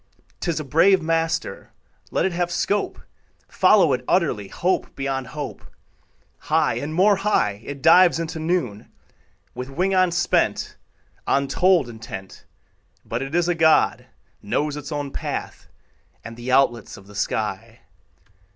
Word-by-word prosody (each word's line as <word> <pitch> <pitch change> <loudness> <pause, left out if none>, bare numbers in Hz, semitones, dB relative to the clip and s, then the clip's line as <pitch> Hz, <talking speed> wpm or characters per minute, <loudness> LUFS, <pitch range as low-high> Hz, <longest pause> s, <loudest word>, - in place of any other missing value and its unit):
'Tis 170 -3 -2
a - - -4
brave 165 +7 +4
master; 165 - -2 0.4
Let - - 0
it 190 - 0
have 175 0 -1
scope: 200 +4 -1 0.5
Follow 185 -9 +4
it 125 - -2
utterly, 150 - +1
Hope 180 - -2
beyond 135 -1 -3
hope: 150 -2 -7 0.8
High - - +1
and 145 +2 -5
more 195 +5 +4
high 110 - 0
It 140 -2 -8
dives 180 -2 +6
into 165 0 -4
noon, 155 - -2 0.6
With 125 +2 -6
wing 185 +8 0
unspent, 175 -2 +1 0.5
Untold 145 +3 +2
intent; 110 -5 -9 0.6
But 115 +2 -3
it 135 +4 -4
is 175 -1 +2
a 175 - +2
God, 160 -2 +3 0.3
Knows 145 +8 -1
its 150 +1 -7
own 145 -2 -3
path - - -5 0.6
And 115 - -9
the 120 +2 -5
outlets 125 -4 +1
of 95 - -15
the 105 - -15
sky. 105 - -3
155 Hz, 135 wpm, -22 LUFS, 130-175 Hz, 0.8 s, dives